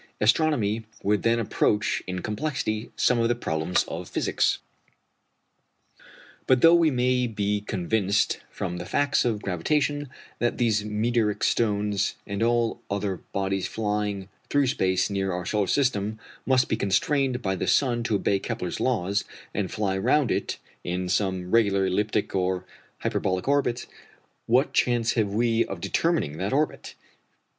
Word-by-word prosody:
Astronomy 115 -3 +2 0.2
would 105 +1 +2
then 115 0 +2
approach 105 -1 +1
in 90 -1 -4
complexity 110 -2 -2
some 125 - +2
of 115 - +3
the 120 - +1
problems 80 -6 0
of - - -6
physics. - - +1 1.9
But 130 -1 +4
though 165 0 +8
we 170 -2 +5
may 125 -1 +1
be 105 -2 -1
convinced 100 +1 0
from 90 - -4
the 90 +1 -6
facts 145 -2 +1
of 110 -3 -1
gravitation 145 - 0 0.3
that 120 - 0
these 110 -4 +2
meteoric 105 0 0
stones, 105 -3 +1
and 100 +1 -4
all 120 0 +1
other 100 -1 -2
bodies 95 -1 -1
flying 105 -3 -2 0.2
through 145 -1 +3
space 95 -6 +1
near 95 -1 -1
our 90 0 -3
solar 105 -1 0
system, 110 -6 +1 0.3
must 130 -1 +4
be - - 0
constrained 130 +6 +1
by 95 -1 0
the - - -3
sun 120 -4 +2
to 110 - +1
obey 100 0 +1
Kepler's 90 -2 -4
laws, 100 -5 0 0.3
and - - -2
fly 100 -3 -1
round 125 +7 +2
it - - -1 0.3
in 90 +1 -2
some 95 -1 -1
regular 100 -4 +3
elliptic 105 +3 0
or 90 -1 0 0.4
hyperbolic 95 +2 -1
orbit, 135 -4 +1 0.6
what 125 +5 +3
chance 120 -2 +2
have 110 -4 +1
we 115 +2 +2
of 95 - -6
determining 95 - 0
that 95 +5 -1
orbit? 150 +2 -1
105 Hz, 145 wpm, -26 LUFS, 95-120 Hz, 1.9 s, though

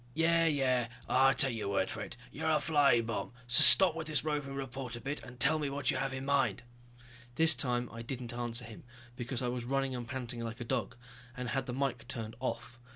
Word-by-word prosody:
"Yeah, 165 +1 +2
yeah... 130 -5 +1 0.2
I 135 +1 +3
take 135 -2 +5
your 105 -3 -4
word 95 -1 -1
for - - -6
it, - - -8
you're - - -3
a - - +2
flying 140 -7 +2
bomb. 115 +1 -5
So 120 - +6
stop 190 -4 +9
with 165 -1 -6
this 150 -4 -1
roving 145 -3 -3
reporter 130 -2 -6
bit 140 +4 -5
and 125 0 -13
tell 150 +6 +4
me 145 -2 -2
what 140 0 -1
you - - -3
have 135 0 -2
in 135 0 -6
mind." 140 -3 0 0.7
This 160 +2 +6
time 125 -3 -1
I 115 - -8
didn't 120 0 -6
answer 120 0 -2
him, 110 -1 -12 0.3
because 125 +1 -4
I - - -1
was 120 0 -3
running 135 +1 -2
and 120 -1 -6
panting 125 -2 -4
like 115 0 -6
a 120 - -6
dog, 115 - -3 0.4
and 125 -1 -4
had 135 0 -2
the 125 - -4
mike 125 -3 -3
turned 115 -4 -6
off. 120 -1 -5
130 Hz, 220 wpm, -31 LUFS, 120-140 Hz, 0.7 s, stop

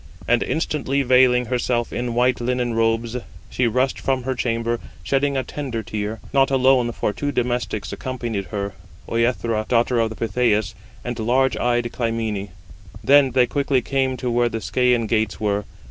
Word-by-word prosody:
And 120 0 +3
instantly 140 -3 -1
veiling 125 -1 +4
herself 120 -1 -1
in 120 -1 -2
white 125 +1 +2
linen 125 -1 0
robes, 115 0 +1
152 125 -1 -6 0.3
she 125 - +2
rushed 130 +3 0
from 130 -2 -1
her 130 +1 -1
chamber, 115 -1 -1 0.2
shedding 140 +7 +1
a 130 - 0
tender 130 -7 -4
tear: 105 0 -4
not 135 -1 +4
alone, 130 -2 +3
for 105 - -2
two 145 +7 -2
domestics 120 -5 -2
accompanied 120 -6 -4
her, 100 +2 -4 0.3
Œthra, 115 -2 0
daughter 120 0 +2
of 110 -1 -1
Pittheus, 110 -3 +1 0.3
and 120 -1 -4
large 130 +4 +2
eyed 120 -1 0
Clymene. 115 -4 -2 0.5
Then 140 -1 +6
they 125 0 +3
quickly 135 -1 0
came 130 -1 0
to 125 -1 -2
where 120 0 +2
the 115 - -3
Scæan 120 +4 +1
gates 110 -1 0
were. 105 -1 0
120 Hz, 160 wpm, -22 LUFS, 115-130 Hz, 0.5 s, Then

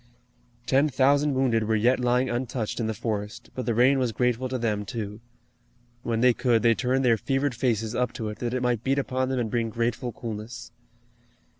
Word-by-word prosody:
Ten 140 +3 +3
thousand 140 +2 +3
wounded 120 -4 +2
were 110 +1 +1
yet 120 +5 +3
lying 125 +1 +2
untouched 120 -2 -3
in 115 - -1
the 110 - -1
forest, 105 -1 -4
but 130 -3 -5
the 115 - +1
rain 130 +4 +4
was 125 -3 0
grateful 125 +2 0
to 130 - -2
them, 110 -4 -1
too. 105 -2 -6 0.8
When 115 -1 -1
they 125 0 +5
could 120 -2 +1
they 115 -1 +5
turned 130 +3 0
their 115 -2 +4
fevered 135 +4 0
faces 115 -2 -1
up 125 0 0
to 110 -3 -4
it 105 - -8
that 120 0 -2
it 125 - -1
might 120 -2 0
beat 135 +2 +1
upon 130 -1 -1
them 130 - -1
and 115 -3 -2
bring 115 -2 0
grateful 120 +2 -2
coolness. 115 +2 -7
120 Hz, 200 wpm, -26 LUFS, 115-130 Hz, 0.8 s, they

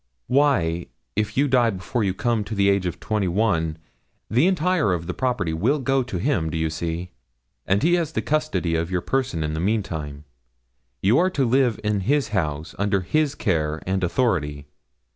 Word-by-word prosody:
'Why, 125 - +2 0.3
if 105 +2 -1
you 145 +2 +4
die 125 -3 +3
before 110 +4 -2
you 95 -2 0
come 115 0 0
to 110 +2 -5
the 100 0 +3
age 100 -2 +2
of 85 - -5
twenty 105 -3 -1
one, 85 -5 +1 0.5
the 125 +10 +4
entire 180 - +2
of 85 -1 -3
the - - -3
property 120 -11 -1
will 110 - +1
go 135 -1 +1
to 120 -7 -4
him 90 - 0
do 80 - -3
you 80 0 0
see? 85 +2 -4 0.6
and 95 +5 +2
he 170 +2 +4
has 170 -3 +1
the - - 0
custody 155 - 0
of 80 +1 0
your 90 -1 -1
person 130 -11 -1
in 75 0 -2
the 80 - -2
meantime; 80 -8 -2 0.8
you 105 +7 +4
are 185 +2 +3
to 145 -7 0
live 125 -2 +2
in 105 -1 +1
his 135 +5 +1
house, 80 -5 -2
under 100 -1 +1
his 150 - 0
care 80 - 0
and 95 0 -1
authority. 75 - 0
100 Hz, 190 wpm, -23 LUFS, 85-130 Hz, 0.8 s, you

